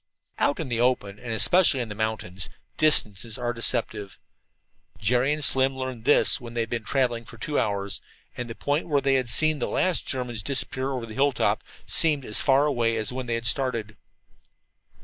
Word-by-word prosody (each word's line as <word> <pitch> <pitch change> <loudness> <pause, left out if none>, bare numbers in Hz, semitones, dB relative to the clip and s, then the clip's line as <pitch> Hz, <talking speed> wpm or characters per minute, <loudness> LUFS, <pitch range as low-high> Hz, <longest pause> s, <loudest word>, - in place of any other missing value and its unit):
Out 145 - +1
in 160 - -3
the 115 -1 -1
open, 110 -5 0
and 120 -2 -7
especially 145 +6 +4
in 120 -3 -3
the - - -5
mountains, 105 -4 -3 0.3
distances 115 -8 +1
are 120 -1 -2
deceptive. 115 -4 -2 0.8
Jerry 120 +5 +1
and 150 0 -1
Slim 135 0 +2
learned 130 -3 -5
this 145 - +5
when 120 -1 -10
they 120 - 0
had 115 - -4
been 115 -2 -2
traveling 120 -1 0
for 115 +1 -13
two 145 +6 -2
hours, 100 -2 -2 0.3
and 125 -1 -6
the 115 - -7
point 145 +4 -1
where 145 -3 +2
they 135 0 +1
had 130 -3 0
seen 155 +4 +3
the - - -1
last 185 -3 0
German 125 -3 -4
disappear 135 -1 0
over 125 -3 -4
a 110 - -10
hilltop 135 +1 +1 0.2
seemed 150 -5 +2
as 105 - -1
far 140 +1 +3
away 120 -5 0
as 110 +2 -3
when 130 -1 -5
they 115 -1 -1
started. 115 -3 +1
125 Hz, 190 wpm, -25 LUFS, 115-135 Hz, 0.8 s, this